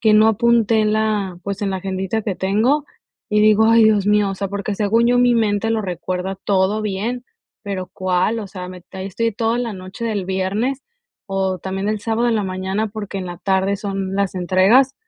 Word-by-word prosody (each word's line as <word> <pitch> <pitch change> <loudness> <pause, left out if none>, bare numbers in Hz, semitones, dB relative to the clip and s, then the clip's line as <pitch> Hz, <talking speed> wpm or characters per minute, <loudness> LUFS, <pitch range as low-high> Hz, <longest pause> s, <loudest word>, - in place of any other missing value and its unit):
que 220 -1 +4
no 215 +1 +6
apunté 225 0 +3
en 215 0 +2
la, 210 -4 0
pues, 200 +1 -4
en 200 - 0
la 190 - -1
agendita 190 +3 -2
que 200 -2 -2
tengo, 220 +11 +1 0.5
y 210 - +3
digo: 215 +1 +5
"Ay, 230 0 +6
Dios 210 -2 +3
mío", 210 -1 +3
o - - -3
sea, 195 0 -3
porque 200 +1 -3
según 225 +3 +2
yo, 245 - +3
mi 245 -1 +4
mente 220 -1 +1
lo 225 -1 +1
recuerda 180 0 -3
todo 200 +2 +1
bien, 215 +5 -3 0.4
pero, 195 -3 -4
¿cuál? 185 +4 0
O 210 - -6
sea, 180 -2 -7
me 180 -1 -10
ahí 190 0 -5
estoy 230 +4 -1
toda 225 +2 0
la 240 -2 -2
noche 190 +4 -8
del 205 -5 -2
viernes, 200 +8 -1 0.5
o 190 -1 -1
también 190 +3 -3
el 215 -1 -1
sábado 225 +2 0
en 230 - +2
la 210 - 0
mañana, 190 +3 -2
porque 205 -2 -6
en 185 - -5
la 175 -1 -6
tarde 190 +1 +1
son 195 -2 -4
las 200 -1 0
entregas. 195 +9 +4
205 Hz, 210 wpm, -20 LUFS, 190-220 Hz, 0.5 s, no